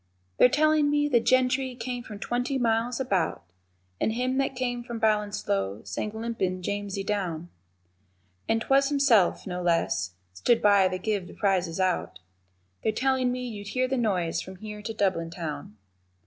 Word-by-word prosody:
They're -, -, +8 dB
tellin' 305 Hz, +1 st, +3 dB
me 290 Hz, 0 st, +2 dB
the 250 Hz, -5 st, +4 dB
gentry 255 Hz, +1 st, +2 dB
came 245 Hz, 0 st, -4 dB
from 215 Hz, -3 st, -9 dB
twenty 245 Hz, +5 st, -1 dB
miles 235 Hz, 0 st, +1 dB
about, 190 Hz, -, 0 dB, 0.6 s
And 220 Hz, -, +1 dB
him 255 Hz, +3 st, 0 dB
that 270 Hz, -1 st, 0 dB
came 245 Hz, -1 st, -2 dB
from 235 Hz, -1 st, -6 dB
Ballinsloe 205 Hz, -, 0 dB
sang 100 Hz, -, -3 dB
limpin' 220 Hz, -5 st, -2 dB
Jamesey 200 Hz, 0 st, -3 dB
down, 180 Hz, -5 st, -2 dB, 1.0 s
And 225 Hz, 0 st, +2 dB
'twas 275 Hz, 0 st, +3 dB
Himself, 275 Hz, -10 st, +3 dB
no 180 Hz, -1 st, -4 dB
less, 165 Hz, -, 0 dB, 0.2 s
stood 230 Hz, -, +2 dB
by 200 Hz, -2 st, +5 dB
to 185 Hz, 0 st, -2 dB
give 200 Hz, -1 st, -2 dB
the -, -, -12 dB
prizes 185 Hz, -4 st, 0 dB
out, 185 Hz, -2 st, 0 dB, 0.6 s
They're 220 Hz, -, +1 dB
tellin' 260 Hz, +2 st, +1 dB
me 250 Hz, 0 st, -3 dB
you'd 205 Hz, -3 st, -7 dB
hear 255 Hz, 0 st, +3 dB
the 265 Hz, -, -1 dB
noise 190 Hz, -9 st, 0 dB
from 190 Hz, -, -9 dB
here 210 Hz, +2 st, -8 dB
to 225 Hz, -, -4 dB
Dublin 190 Hz, -6 st, 0 dB
town. 150 Hz, -, -6 dB
215 Hz, 160 wpm, -27 LUFS, 185-250 Hz, 1.0 s, They're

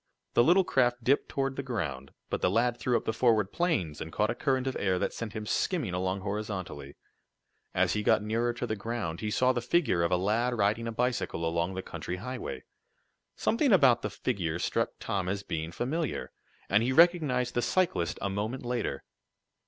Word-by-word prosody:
The 120 Hz, -, +5 dB
little 180 Hz, +8 st, +5 dB
craft 120 Hz, -6 st, +1 dB
dipped 135 Hz, +5 st, +2 dB
toward 135 Hz, -1 st, -1 dB
the -, -, -1 dB
ground, 80 Hz, -, -4 dB, 0.2 s
but -, -, -1 dB
the -, -, +3 dB
lad 115 Hz, +4 st, +2 dB
threw 120 Hz, +2 st, +2 dB
up -, -, -6 dB
the 110 Hz, -, 0 dB
forward 110 Hz, -4 st, +2 dB
planes, 155 Hz, -, -1 dB
and 80 Hz, -, -5 dB
caught 105 Hz, +6 st, +1 dB
a -, -, -1 dB
current 130 Hz, 0 st, 0 dB
of 130 Hz, -, -2 dB
air 95 Hz, -2 st, +1 dB
that -, -, -1 dB
sent 115 Hz, -3 st, -5 dB
him 110 Hz, -1 st, -5 dB
skimming 135 Hz, -, 0 dB
along 95 Hz, +1 st, -1 dB
horizontally. 95 Hz, -8 st, -5 dB, 0.8 s
As -, -, +3 dB
he 105 Hz, -, 0 dB
got 105 Hz, -, +3 dB
nearer 115 Hz, +3 st, 0 dB
to 120 Hz, +1 st, -4 dB
the 110 Hz, -, -2 dB
ground, 105 Hz, -6 st, -4 dB
he 105 Hz, -, -2 dB
saw 125 Hz, +4 st, +3 dB
the 120 Hz, -, -1 dB
figure 125 Hz, -, +2 dB
of 85 Hz, +1 st, +1 dB
a 90 Hz, -, +4 dB
lad 115 Hz, +6 st, +1 dB
riding 110 Hz, +3 st, +1 dB
a -, -, -2 dB
bicycle 120 Hz, -8 st, -1 dB
along 85 Hz, +3 st, -1 dB
the 95 Hz, -, -4 dB
country 90 Hz, 0 st, -5 dB
highway. 125 Hz, +6 st, -6 dB, 0.7 s
Something 255 Hz, +3 st, +2 dB
about 130 Hz, -, +6 dB
the 105 Hz, -, -2 dB
figure 85 Hz, -4 st, -2 dB
struck -, -, 0 dB
Tom 95 Hz, -3 st, -2 dB
as 100 Hz, +1 st, -2 dB
being 80 Hz, -3 st, -4 dB
familiar, 150 Hz, -, -2 dB, 0.4 s
and 100 Hz, +3 st, +3 dB
he 120 Hz, +3 st, +1 dB
recognized 145 Hz, -6 st, +4 dB
the 120 Hz, -, +1 dB
cyclist 170 Hz, -, 0 dB
a 100 Hz, -, 0 dB
moment 110 Hz, +6 st, -3 dB
later. 120 Hz, -, -2 dB
115 Hz, 200 wpm, -29 LUFS, 95-125 Hz, 0.8 s, about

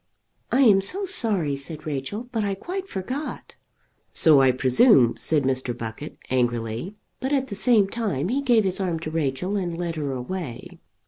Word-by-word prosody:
"I 265 Hz, -, +3 dB
am 205 Hz, -7 st, +5 dB
so 385 Hz, -, -2 dB
sorry," 205 Hz, -, +3 dB
said 150 Hz, +3 st, -6 dB
Rachel, 155 Hz, -, -5 dB
"but 225 Hz, -3 st, -1 dB
I 200 Hz, -1 st, -1 dB
quite 370 Hz, -, -6 dB
forgot." 255 Hz, +11 st, -6 dB, 0.6 s
"So 150 Hz, -4 st, +5 dB
I 135 Hz, -, +5 dB
presume," 130 Hz, -, +4 dB
said 150 Hz, -3 st, +1 dB
Mr. 130 Hz, -2 st, -2 dB
Buckett 115 Hz, +6 st, -7 dB
angrily, 120 Hz, -, -2 dB, 0.2 s
but 265 Hz, +2 st, -3 dB
at 265 Hz, -2 st, 0 dB
the -, -, -5 dB
same 215 Hz, 0 st, +3 dB
time 195 Hz, -, -3 dB
he 270 Hz, +4 st, 0 dB
gave 240 Hz, -5 st, +3 dB
his 190 Hz, -1 st, -1 dB
arm 180 Hz, -4 st, -1 dB
to 155 Hz, -, -5 dB
Rachel 160 Hz, +5 st, -2 dB
and 175 Hz, -4 st, -3 dB
led 170 Hz, -2 st, -4 dB
her 145 Hz, -3 st, -3 dB
away. 130 Hz, 0 st, -6 dB
175 Hz, 175 wpm, -24 LUFS, 135-220 Hz, 0.6 s, am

